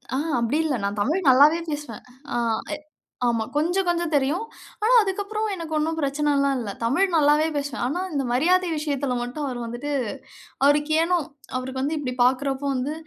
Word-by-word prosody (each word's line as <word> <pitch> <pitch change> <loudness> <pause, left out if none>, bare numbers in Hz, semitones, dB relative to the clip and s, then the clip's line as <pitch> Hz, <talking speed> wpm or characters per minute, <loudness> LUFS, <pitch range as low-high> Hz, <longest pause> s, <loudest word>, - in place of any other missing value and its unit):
ஆ, - - +1 0.2
அப்படி 235 +6 0
இல்ல. 295 -4 0
நான் 200 +1 -2
தமிழ் 320 - 0
நல்லாவே 290 +6 +6
பேசுவேன். 290 -7 -6 0.3
ஆ - - +1 0.4
எ - - -8 0.5
ஆமா. 230 -2 +1
கொஞ்சம் 350 +5 +1
கொஞ்சம் 345 -1 0
தெரியும். 290 +9 +1 0.4
ஆனா 460 +3 +4
அதுக்கப்புறம் 410 +2 -2
எனக்கு 330 -2 -6
ஒண்ணும் 320 +1 -1
பிரச்சனலாம் 280 -1 +1
இல்ல. 225 -4 -4
தமிழ் 275 +12 +2
நல்லாவே 300 0 +4
பேசுவேன். 280 -3 -3
ஆனா 325 +7 -2
இந்த 280 -2 0
மரியாதை 355 +8 +3
விஷயத்துல 285 -4 -1
மட்டும் 245 +5 -4
அவர் 250 -2 -4
வந்துட்டு 240 +5 -5 0.7
அவருக்கு 295 +2 +3
ஏனோ, 355 +1 +2 0.4
அவருக்கு 260 +1 -4
வந்து 300 +4 -1
இப்படி 255 -3 -3
பார்க்கிறப்போ 265 +2 +1
வந்து, 260 +4 -2
290 Hz, 165 wpm, -24 LUFS, 260-325 Hz, 0.7 s, நல்லாவே